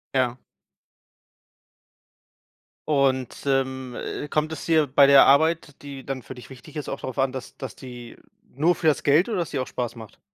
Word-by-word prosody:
Ja. 125 Hz, -1 st, +1 dB, 2.5 s
Und, 135 Hz, -4 st, 0 dB
ähm, 130 Hz, -2 st, -1 dB
äh, 145 Hz, -, -5 dB
kommt 155 Hz, +2 st, -1 dB
es 160 Hz, -, -6 dB
dir 160 Hz, -2 st, +4 dB
bei 140 Hz, +1 st, +5 dB
der 140 Hz, -1 st, +8 dB
Arbeit, 155 Hz, +1 st, +2 dB
die 140 Hz, -2 st, -9 dB
dann 135 Hz, -2 st, -4 dB
für 130 Hz, -, -10 dB
dich 125 Hz, -, -12 dB
wichtig 130 Hz, +4 st, -13 dB
ist, 150 Hz, -, -5 dB
auch 135 Hz, -, -4 dB
drauf 130 Hz, +1 st, -6 dB
an, 135 Hz, -1 st, +1 dB
dass 130 Hz, -1 st, -8 dB
dass 135 Hz, -, -7 dB
die 120 Hz, -2 st, -10 dB, 0.4 s
nur 160 Hz, +6 st, +2 dB
für 165 Hz, -, -7 dB
das 150 Hz, -, +3 dB
Geld 150 Hz, +8 st, +4 dB
oder 210 Hz, -6 st, -2 dB
dass 170 Hz, -, -2 dB
die 140 Hz, -, -4 dB
auch 130 Hz, -, -1 dB
Spaß 120 Hz, -1 st, -4 dB
macht? 110 Hz, -2 st, -12 dB
135 Hz, 185 wpm, -24 LUFS, 130-150 Hz, 2.5 s, der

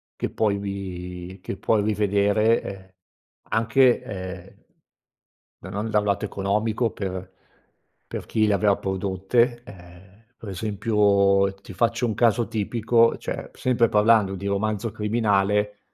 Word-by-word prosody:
che -, -, -3 dB
puoi 105 Hz, -2 st, +1 dB
ri 95 Hz, -2 st, -6 dB
che 95 Hz, -, -6 dB
puoi 110 Hz, -2 st, +1 dB
rivedere, 105 Hz, +1 st, +2 dB
ehm, 95 Hz, -1 st, -9 dB, 0.6 s
anche, 120 Hz, +3 st, +3 dB
ehm, 95 Hz, -2 st, -8 dB, 1.0 s
da -, -, -10 dB
non 105 Hz, +3 st, -3 dB
da 105 Hz, -, +4 dB
un 105 Hz, -, -3 dB
lato 100 Hz, -1 st, 0 dB
economico 105 Hz, +4 st, -1 dB
per 95 Hz, -1 st, -6 dB, 0.7 s
per -, -, -6 dB
chi 110 Hz, -1 st, +1 dB
le 105 Hz, -, +2 dB
aveva 100 Hz, +1 st, +3 dB
prodotte. 100 Hz, +6 st, 0 dB
Ehm, 95 Hz, +2 st, -15 dB
per 105 Hz, -, -9 dB
esempio, 100 Hz, -1 st, +2 dB
ti 95 Hz, 0 st, -12 dB
faccio 115 Hz, +5 st, +1 dB
un 110 Hz, -, -1 dB
caso 120 Hz, -1 st, +2 dB
tipico: 115 Hz, +2 st, +2 dB
cioè, -, -, -6 dB
p -, -, -25 dB
sempre 120 Hz, -2 st, +2 dB
parlando 105 Hz, -2 st, +4 dB
di 100 Hz, +2 st, -5 dB
Romanzo 105 Hz, +2 st, -1 dB
Criminale, 105 Hz, -1 st, 0 dB
105 Hz, 135 wpm, -24 LUFS, 95-110 Hz, 1.0 s, da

